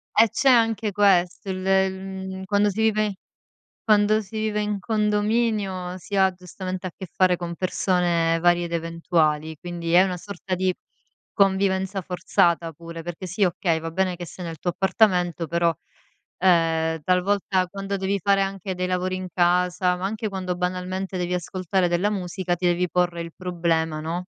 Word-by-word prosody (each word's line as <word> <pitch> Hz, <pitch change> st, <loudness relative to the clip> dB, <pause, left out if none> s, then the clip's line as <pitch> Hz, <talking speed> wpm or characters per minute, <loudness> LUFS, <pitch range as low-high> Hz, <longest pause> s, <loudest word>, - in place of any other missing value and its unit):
E 225 Hz, +1 st, +6 dB
c'è 275 Hz, -, +2 dB
anche 225 Hz, -3 st, +3 dB
questo! 195 Hz, -1 st, +2 dB
Il 190 Hz, -, -2 dB
il 190 Hz, 0 st, +3 dB
mhmm, 190 Hz, 0 st, -7 dB
quando 205 Hz, +1 st, +2 dB
si 210 Hz, +3 st, -2 dB
vive 215 Hz, -2 st, +1 dB, 0.7 s
quando 215 Hz, 0 st, +4 dB
si 220 Hz, +2 st, -8 dB
vive 215 Hz, -1 st, -1 dB
in 210 Hz, -1 st, -2 dB
condominio 210 Hz, -3 st, 0 dB
si 200 Hz, +2 st, -6 dB
ha, 190 Hz, -1 st, +4 dB
giustamente, 185 Hz, +1 st, -6 dB
a -, -, -7 dB
che 190 Hz, -, -8 dB
fare 185 Hz, -1 st, +3 dB
con 170 Hz, -1 st, -5 dB
persone 175 Hz, -2 st, +1 dB
varie 175 Hz, 0 st, +3 dB
ed 170 Hz, -, -7 dB
eventuali, 165 Hz, -2 st, 0 dB
quindi 170 Hz, -1 st, -5 dB
è 180 Hz, -, +8 dB
una 185 Hz, -2 st, -2 dB
sorta 190 Hz, 0 st, -5 dB
di, 185 Hz, 0 st, +1 dB, 0.6 s
convivenza 195 Hz, -1 st, +1 dB
forzata, 170 Hz, -2 st, +1 dB
pure, 165 Hz, +1 st, -9 dB
perché 175 Hz, +2 st, -6 dB
sì, 185 Hz, +3 st, 0 dB
okay, 175 Hz, -2 st, +1 dB
va 165 Hz, 0 st, -5 dB
bene 185 Hz, +1 st, 0 dB
che 175 Hz, 0 st, -7 dB
sei 180 Hz, +2 st, -9 dB
nel 165 Hz, -1 st, -6 dB
tuo 175 Hz, -, -1 dB
appartamento 180 Hz, -3 st, +2 dB
però, 170 Hz, 0 st, +2 dB, 0.7 s
ehm, 165 Hz, -3 st, +2 dB
talvolta, 185 Hz, +1 st, +1 dB
quando 195 Hz, +2 st, -4 dB
devi 195 Hz, +1 st, -1 dB
fare 200 Hz, -1 st, +3 dB
anche 195 Hz, 0 st, -3 dB
dei 180 Hz, 0 st, -2 dB
lavori 185 Hz, 0 st, -1 dB
in 185 Hz, 0 st, -5 dB
casa, 180 Hz, +1 st, +2 dB
ma 180 Hz, -, -4 dB
anche 215 Hz, +2 st, -2 dB
quando, 185 Hz, -2 st, -3 dB
banalmente, 185 Hz, +1 st, -3 dB
devi 180 Hz, 0 st, -2 dB
ascoltare 180 Hz, +2 st, -1 dB
della 175 Hz, +4 st, +1 dB
musica, 180 Hz, -2 st, -2 dB
ti 175 Hz, +1 st, -4 dB
devi 175 Hz, +1 st, +1 dB
porre 175 Hz, -1 st, 0 dB
il 165 Hz, -1 st, -7 dB
problema, 165 Hz, -3 st, -1 dB
no, 170 Hz, +3 st, -3 dB
185 Hz, 170 wpm, -24 LUFS, 175-195 Hz, 0.7 s, è